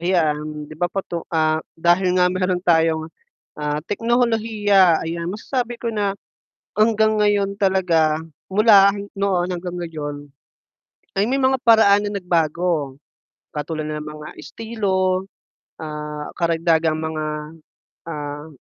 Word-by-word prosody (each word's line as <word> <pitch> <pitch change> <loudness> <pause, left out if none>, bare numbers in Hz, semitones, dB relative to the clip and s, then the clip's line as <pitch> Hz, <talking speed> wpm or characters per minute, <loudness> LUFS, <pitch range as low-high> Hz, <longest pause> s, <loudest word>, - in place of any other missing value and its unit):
Ayan, 155 -4 0
'di 150 - -12
ba 175 - +2
patu 175 -2 -4
ah, 155 -1 +1 0.2
dahil 175 +2 +2
nga 180 - +5
mayro'n 185 -1 -1
tayong, 160 -2 +3 0.6
ah, 150 +1 -2
teknolohiya, 215 -4 +2
ayan. 170 +1 -3
Masasabi 240 +5 -3
ko 235 -1 -4
na 200 -2 -1 0.6
hanggang 215 0 +3
ngayon 205 -1 +1
talaga, 170 -6 +2 0.2
mula 200 -1 +6 0.2
noon 190 -3 +1
hanggang 180 0 -4
ngayon 145 -3 -6 0.9
ay 195 - +2
may 265 +4 0
mga 265 0 +3
paraan 215 -3 +6
na 205 -1 -3
nagbago 165 -5 0 0.5
katulad 155 +1 -4
ng 150 0 -4
mga 150 0 -8
estilo, 190 0 -1 0.6
ah, 150 -1 -6
karagdagang 165 -2 +1
mga, 160 -1 -3 0.8
ah, 150 -1 -6
175 Hz, 115 wpm, -21 LUFS, 155-200 Hz, 0.9 s, mula